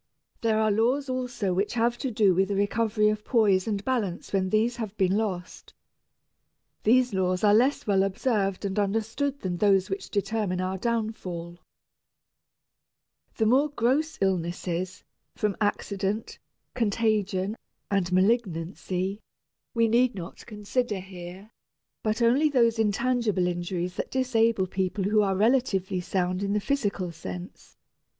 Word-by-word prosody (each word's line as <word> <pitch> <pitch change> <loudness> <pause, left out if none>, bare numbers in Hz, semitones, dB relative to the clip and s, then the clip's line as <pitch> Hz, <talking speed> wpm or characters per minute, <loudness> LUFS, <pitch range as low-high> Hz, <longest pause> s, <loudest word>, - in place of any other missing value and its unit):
There 225 -1 +2
are 215 -1 +3
laws 250 +7 +1
also 250 -7 -2
which 195 +6 -1
have 235 +1 +2
to 265 - -2
do 210 -4 +3
with 190 +2 +2
the 200 - -2
recovery 210 +1 +2
of 210 0 -2
poise 210 -6 +3
and 205 -2 -2
balance 215 -11 -2
when 190 -1 +1
these 225 +4 +1
have 215 -3 -5
been 190 -1 +2
lost. 190 -5 -4 1.1
These 250 +1 +3
laws 185 0 0
are 205 -1 +6
less 255 +6 +3
well 195 -2 +3
observed 195 0 0
and 195 +1 -1
understood 225 +7 -1
than 180 -2 -2
those 195 -1 +3
which 195 - -4
determine 200 -2 -1
our 185 +1 -2
downfall. 190 -7 -3 1.8
The 220 - +2
more 265 +7 +4
gross 290 +4 0
illnesses, 180 0 -2 0.3
from 210 -2 -1
accident, 205 0 -2 0.3
contagion, 210 -3 0 0.4
and 190 -3 +1
malignancy, 185 -1 0 0.6
we 230 0 +4
need 235 +1 +3
not 175 +3 -9
consider 210 +1 -2
here, 185 +2 -10 0.5
but 220 +2 0
only 265 +7 +4
those 235 -5 +3
intangible 220 -2 +1
injuries 175 +1 -3
that - - -3
disable 230 -6 +2
people 190 +1 -2
who 210 +2 +3
are 195 -2 +1
relatively 200 -4 +1
sound 180 0 -1
in 200 0 -1
the 210 - +2
physical 200 -7 -1
sense. 175 +2 -9
205 Hz, 135 wpm, -27 LUFS, 185-230 Hz, 1.8 s, are